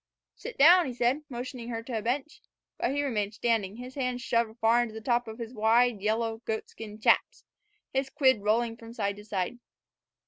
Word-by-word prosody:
"Sit 480 - -9
down," 340 +3 +7
he 250 - -5
said, 245 +5 +1
motioning 245 -1 -6
her 230 -1 -4
to 235 0 -5
a - - -6
bench. 265 +7 -3 0.4
But - - +1
he 285 +2 0
remained 210 -6 -2
standing, 215 -5 0
his 250 +2 -9
hands 250 -2 -2
shoved 230 -2 0
far 230 +1 +4
into 225 -2 -4
the - - -5
top 240 +1 0
of 220 0 -7
his 230 0 -7
wide, 225 0 +3
yellow, 225 +2 -1
goatskin 220 -1 -6
"chaps," - - +2 0.5
his 265 0 0
quid 260 -6 +3
rolling 225 +2 +1
from 230 0 -11
side 200 -3 -2
to 205 - -10
side. 205 +2 -3
235 Hz, 195 wpm, -28 LUFS, 220-250 Hz, 0.5 s, down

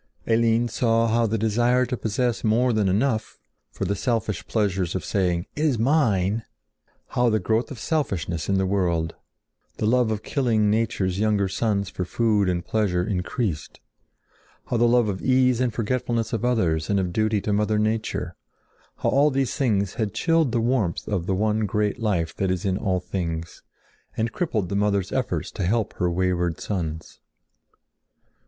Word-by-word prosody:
Eline 115 +1 +2
saw 115 0 +1
how 115 +1 +2
the 110 +1 0
desire 120 +4 +2
to 125 - -3
possess 120 +1 -1
more 120 +3 +2
than 105 -3 +2
enough, 110 +2 0 0.3
for - - -4
the 100 - 0
selfish 110 -4 -1
pleasure 100 -4 0
of 90 -2 -2
saying, 90 -3 0
"It 150 - -2
is 145 -6 +2
mine!"—how 115 - -1
the 110 - +2
growth 110 +4 0
of 140 - -7
selfishness 95 - -2
in 100 - +2
the 95 - +1
world; 85 -4 0 0.6
the - - -1
love 120 +1 +3
of 110 -1 -2
killing 110 -6 +1
nature's 100 -4 0
younger 105 -2 +2
sons 100 -1 -1
for 90 - -3
food 105 0 +1
and 85 -1 -2
pleasure 100 -5 0
increased; 95 - -3 0.9
how 120 - -1
the 120 +1 +4
love 120 -1 +3
of 95 -3 -3
ease 130 0 +3
and 125 -2 +1
forgetfulness 115 0 -1
of 115 - -1
others 90 -11 +1
and 100 -1 +2
of 90 -2 -2
duty 110 0 +1
to 105 - -1
mother 105 +1 +1
nature—how 110 +1 -4
all 140 +3 +4
these 135 -2 -1
things 100 -8 +1
had 110 -3 -3
chilled 165 0 +2
the 120 - +1
warmth 115 -7 0
of 95 -4 -2
the 95 - +1
one 105 +2 +1
great 105 +3 -1
life 90 -8 -1
that 95 - 0
is 90 0 -1
in 95 -1 +1
all 95 -1 0
things, 85 -3 -4 0.6
and 110 0 0
crippled 110 - -2
the 100 - -2
mother's 100 -2 +1
efforts - - -2
to - - -4
help 110 +4 0
her 90 - +1
wayward 90 -1 0
sons. 80 -5 -4
105 Hz, 170 wpm, -24 LUFS, 95-115 Hz, 0.9 s, the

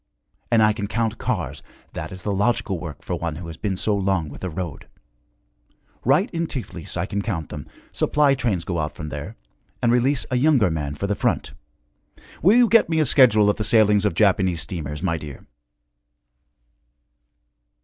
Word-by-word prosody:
And 115 -2 +4
I 105 0 +4
can 105 -1 -4
count 110 0 -1
cars - - -3 0.3
that - - -6
is 90 -1 -9
the 105 - -1
logical 105 -2 0
work 80 -5 -8
for - - -4
one 85 -2 -3
who 85 +3 -8
had 80 -1 -9
been 100 -3 -1
so 105 +2 +1
long 95 -5 0
with - - -11
the 95 - -3
road. 85 0 -6 1.2
Right 150 - +3
in 170 -1 -2
Tiflis 95 - -6
I 85 - 0
can 100 +1 -3
count 95 -8 -3
them, 75 - -7 0.2
supply 145 -1 +2
trains 110 -10 -1
go 85 -2 -2
out 75 0 -2
from 75 -1 -6
there, - - -7 0.4
and 120 -2 +2
release 125 +3 +2
a 125 - +2
younger 125 - +3
man 75 -2 -3
for 100 - -3
the 100 - 0
front. - - -1 0.9
Will 200 +8 +5
you 245 -1 +6
get 225 -5 +4
me 160 -1 +1
a 155 - +3
schedule 120 -6 +5
of 105 - +2
the 110 - -2
sailings 105 -2 +4
of 105 -6 0
Japanese 95 -4 +2
steamers, 75 -4 -5
my 85 -3 0
dear?' 75 -4 -10
100 Hz, 185 wpm, -23 LUFS, 85-120 Hz, 1.2 s, you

